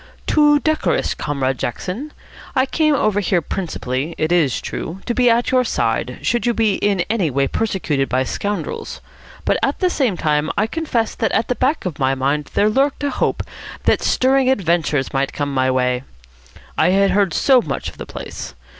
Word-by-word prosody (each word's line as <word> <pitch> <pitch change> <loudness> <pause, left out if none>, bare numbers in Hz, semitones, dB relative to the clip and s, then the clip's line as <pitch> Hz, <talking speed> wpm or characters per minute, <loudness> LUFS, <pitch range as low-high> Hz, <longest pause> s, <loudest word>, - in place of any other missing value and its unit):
"Too 295 -1 +4
decorous, 310 +1 0
Comrade 135 -3 -2
Jackson. 190 - -4 0.4
I 260 - +3
came 305 +2 +2
over 215 -6 +1
here 190 -2 +1
principally, 155 -4 -3
it 155 +1 0
is 160 -7 +2
true, 175 +4 -5
to 240 - -1
be 245 0 +3
at 235 +1 +2
your 255 -1 +4
side, 235 - -1
should 240 0 +1
you 240 - +2
be 220 -3 +2
in 200 -3 +1
any 205 -7 0
way 135 +1 +1
persecuted 155 -8 -1
by 130 +1 +1
scoundrels. 205 - -4 0.5
But - - +2
at - - 0
the 365 -1 +1
same 250 - 0
time 150 0 +1
I 205 - +3
confess 240 -4 -1
that 225 - -1
at 225 - +1
the 250 - +1
back 260 +4 0
of 175 -6 -4
my 135 0 +2
mind 140 +2 -1
there 205 - +4
lurked 270 +6 +1
a 285 - 0
hope - - -1 0.4
that - - +2
stirring 260 0 +3
adventures 170 - +1
might 135 0 0
come 145 -1 -2
my 130 -1 +2
way. 125 -1 +1 0.8
I 160 - +4
had 195 +1 +3
heard 195 -1 +2
so 260 - +4
much - - -4
of - - -9
the - - -7
place. - - -7
195 Hz, 190 wpm, -19 LUFS, -, 0.8 s, Too